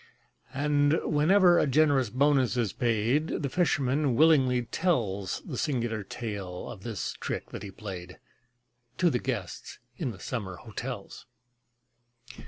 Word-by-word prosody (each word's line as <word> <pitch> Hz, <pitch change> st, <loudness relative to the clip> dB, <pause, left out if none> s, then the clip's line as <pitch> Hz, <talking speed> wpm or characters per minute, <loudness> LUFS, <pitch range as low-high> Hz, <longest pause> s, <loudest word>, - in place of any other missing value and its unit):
And, 145 Hz, +2 st, +2 dB
whenever 175 Hz, +4 st, +4 dB
a -, -, +2 dB
generous 140 Hz, -3 st, +3 dB
bonus 130 Hz, 0 st, +2 dB
is 115 Hz, -5 st, 0 dB
paid, 120 Hz, +5 st, +1 dB, 0.2 s
The 140 Hz, -, 0 dB
fisherman 140 Hz, -5 st, +1 dB
willingly 130 Hz, -4 st, +4 dB
tells 110 Hz, -, -1 dB
The -, -, -5 dB
singular 120 Hz, -6 st, -1 dB
tale 100 Hz, -2 st, -6 dB
of 105 Hz, -5 st, -10 dB
this 115 Hz, -2 st, -4 dB
trick -, -, -4 dB
that -, -, -6 dB
he 100 Hz, -, -7 dB
played, 95 Hz, -3 st, -8 dB, 0.8 s
To 175 Hz, -2 st, +3 dB
the 125 Hz, -, 0 dB
guests 115 Hz, -9 st, -5 dB, 0.2 s
in 145 Hz, -, -2 dB
the 100 Hz, -6 st, -8 dB
summer 100 Hz, -7 st, -4 dB
hotels. -, -, -7 dB
125 Hz, 130 wpm, -28 LUFS, 105-145 Hz, 0.8 s, whenever